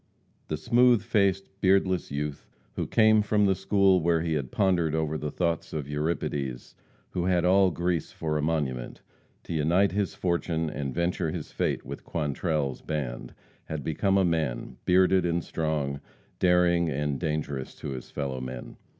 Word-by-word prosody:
The 75 - -2
smooth 120 +6 +4
faced, 95 -2 +1
beardless 95 -2 +2
youth 70 0 -4 0.3
who - - -2
came 110 -1 +5
from 105 0 +2
the 95 - +4
school 95 -1 +3
where 85 0 +2
he 80 -1 -1
had 70 -4 -2
pondered 85 -5 +2
over 80 -1 -1
the 75 0 -3
thoughts 85 +1 -2
of 75 -3 -3
Euripides, 75 -4 -3 0.4
who 90 -1 -1
had 90 -2 +2
all 95 +1 +5
Greece 85 -1 -1
for 80 -1 -3
a 75 - +1
monument, 70 -6 -2 0.4
to - - -6
unite 85 +6 +3
his 100 +1 -1
fortune 85 -3 -1
and 70 -2 -3
venture 85 +1 -1
his - - -5
fate - - -1
with - - -7
Quantrell's 75 -2 -2
band, 70 -6 -4 0.3
had 80 -3 -5
become 95 +7 +1
a 95 - +4
man, 75 -8 -1
bearded 95 0 +4
and 85 -1 0
strong, 75 -3 -2 0.4
daring 90 -2 +3
and 75 -1 -1
dangerous 75 -5 -3
to - - -6
his 65 -2 -6
fellow 70 -3 -4
men. 65 -1 -7
80 Hz, 160 wpm, -27 LUFS, 75-90 Hz, 0.4 s, came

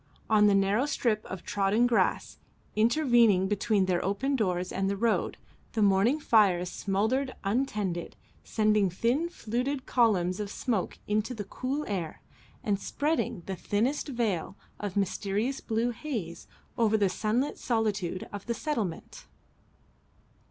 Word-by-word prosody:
On 210 -1 +6
the 200 - +4
narrow 200 +7 +2
strip 225 -7 0
of 185 -1 -7
trodden 205 +4 +2
grass 245 -2 +1 0.4
intervening 230 -5 +4
between 210 0 +1
their 180 -2 0
open 265 +9 0
doors 185 -6 -1
and 195 0 -1
the 200 - -1
road, 225 +1 0 0.4
the 220 - +2
morning 200 +9 +3
fires 190 - +3
smouldered 220 +7 0
untended, 200 -5 -1 0.3
sending 215 -2 +2
thin 240 - 0
fluted 255 0 -3
columns 190 -7 +2
of 205 -1 -3
smoke 215 -4 -2
into 215 +4 -1
the 210 - -4
cool 265 +8 -3
air, 180 -6 -4 0.4
and 200 -2 0
spreading 290 - -1
the 190 - -4
thinnest 235 - -1
veil 220 - -2 0.2
of 205 -2 -4
mysterious 200 +6 -1
blue 230 +2 0
haze 225 - -5 0.3
over 220 -1 +4
the 205 -2 +3
sunlit 220 +8 -1
solitude 210 -6 -1
of 205 +1 -7
the 235 - -1
settlement. 225 - -4
215 Hz, 135 wpm, -29 LUFS, 195-240 Hz, 0.4 s, On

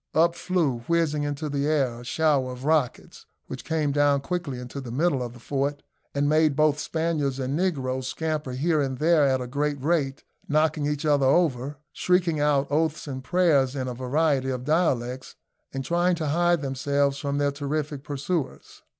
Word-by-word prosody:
Up 170 +1 +4
flew, 170 -8 0
whizzing 165 -3 +1
into 145 +1 -3
the 140 0 -1
air, 135 -6 +1
a - - -10
shower 140 -1 +1
of 125 +1 -8
rockets, 155 -5 -1 0.2
which - - -7
came 155 -3 0
down 145 -1 +3
quickly 160 -3 -3
into 125 +3 -7
the 130 - -8
middle 140 +2 +1
of 120 -1 -5
the 120 - -13
fort, 140 +3 -2 0.3
and 140 0 +1
made 155 -1 +3
both 150 0 +3
Spaniards 155 -5 -1
and 135 +1 -2
negroes 130 -7 -1
scamper 155 -1 -3
here 155 +4 +1
and 135 -2 -2
there 155 0 +4
at 130 -1 +1
a - - -3
great 145 +3 -2
rate, 140 -2 0 0.3
knocking 155 0 +2
each 150 0 -2
other 145 -3 +3
over, 140 -2 +1 0.2
shrieking 180 -4 +1
out 145 -1 +2
oaths 155 +1 0
and 130 -2 -5
prayers 145 -7 +2
in 130 -2 -2
a 125 - -3
variety 135 +2 0
of 125 -1 -3
dialects, 130 -6 0 0.4
and 135 -1 -4
trying 175 +1 +2
to 160 -3 -2
hide 175 0 +2
themselves 140 +1 0
from 140 -1 -2
their 145 0 +1
terrific 145 0 -3
pursuers. 145 +2 -4
145 Hz, 180 wpm, -25 LUFS, 135-160 Hz, 0.4 s, Up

